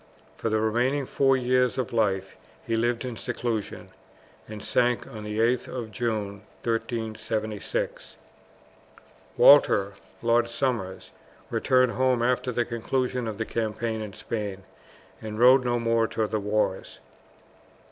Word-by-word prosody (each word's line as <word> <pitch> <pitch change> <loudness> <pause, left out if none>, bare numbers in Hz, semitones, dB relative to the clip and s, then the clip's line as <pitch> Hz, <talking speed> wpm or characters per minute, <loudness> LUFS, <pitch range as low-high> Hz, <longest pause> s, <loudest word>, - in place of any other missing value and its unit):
For 115 - -2
the 110 0 +1
remaining 120 +6 +1
four 135 +1 +2
years 125 0 +2
of 130 -3 -2
life 95 -4 0 0.3
he 115 - 0
lived 120 +2 0
in 125 -2 -4
seclusion, 115 -3 -4 0.6
and 110 -2 -8
sank 120 +2 +1
on 110 -1 -9
the 105 0 -5
8th 120 +2 +2
of 115 -4 -6
June, 105 -2 -3 0.2
1376. 110 -2 -3 1.2
Walter, 100 -8 +6 0.3
Lord 120 0 +3
Somers, 115 -7 -2 0.4
returned 130 -1 +3
home 130 -1 +1
after 125 +1 +1
the 120 0 0
conclusion 125 +1 -2
of 110 -2 -4
the 110 - -2
campaign 110 0 -2
in 105 -2 -6
Spain, 100 -3 -5 0.6
and 110 -1 -6
rode 130 +3 +6
no 120 -1 +1
more 115 -1 +2
to 110 - -1
the 110 0 -2
wars. 105 -2 -1
115 Hz, 130 wpm, -26 LUFS, 110-125 Hz, 1.2 s, Walter